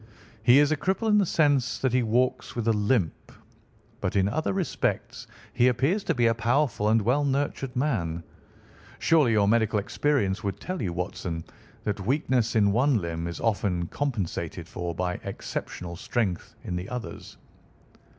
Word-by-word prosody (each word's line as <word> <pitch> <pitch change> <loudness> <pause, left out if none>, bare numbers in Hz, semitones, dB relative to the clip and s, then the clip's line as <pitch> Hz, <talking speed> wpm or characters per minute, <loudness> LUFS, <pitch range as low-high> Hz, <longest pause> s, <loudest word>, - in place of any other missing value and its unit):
"He 120 +4 +6
is 145 +1 +5
a 155 - +2
cripple 190 +8 0
in 210 0 +5
the 195 - +2
sense 145 -6 +2
that 130 -2 0
he 130 - +4
walks 120 +3 0
with 115 -2 -2
a 115 - +4
limp; 105 -4 0 0.7
but 100 -5 -2
in 95 -1 +3
other 155 +10 -1
respects 190 -3 -2 0.3
he 120 0 +4
appears 140 - +1
to - - +1
be 120 -1 +2
a 115 - +4
powerful 115 -1 +1
and 115 +1 +4
well 130 +7 +2
nurtured 135 -2 -1
man. 90 - -1 0.7
Surely 150 -8 +3
your 105 -2 +3
medical 110 0 +3
experience 105 -1 0
would 100 -2 -3
tell 185 0 -4
you, 95 - -1
Watson, 85 -1 -4 0.4
that 105 -1 -2
weakness 130 -1 +1
in 100 -2 +4
one 125 +4 +3
limb 85 -1 -3
is 85 - -5
often 100 -5 0
compensated 120 - -3
for 85 -1 -4
by 90 0 -2
exceptional 85 -1 -5
strength 95 0 -2
in 90 - -4
the 90 +2 -5
others." 125 -2 -7
115 Hz, 165 wpm, -27 LUFS, 95-140 Hz, 0.7 s, He